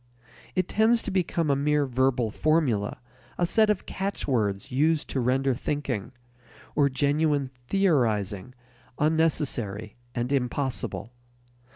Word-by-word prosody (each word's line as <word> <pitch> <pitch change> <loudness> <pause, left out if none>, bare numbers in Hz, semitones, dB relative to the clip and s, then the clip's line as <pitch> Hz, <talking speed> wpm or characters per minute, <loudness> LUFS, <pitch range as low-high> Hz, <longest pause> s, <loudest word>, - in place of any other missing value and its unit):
It 185 -1 +1
tends 225 +2 +3
to 205 - -3
become 170 -4 +1
a - - +3
mere 150 +1 +2
verbal 130 -3 +1
formula, 135 -9 +1 0.4
a 175 - +2
set 215 +4 +3
of 210 -3 0
catchwords 125 - -2
used 155 +4 +2
to 135 - -1
render 130 +2 +2
thinking, 125 -4 -3 0.6
or 145 -1 +3
genuine 145 0 +1 0.2
theorizing, 120 - +1 0.4
unnecessary 140 -10 0 0.2
and 120 +1 -2
impossible. 130 -2 -2
140 Hz, 110 wpm, -26 LUFS, 120-160 Hz, 0.6 s, tends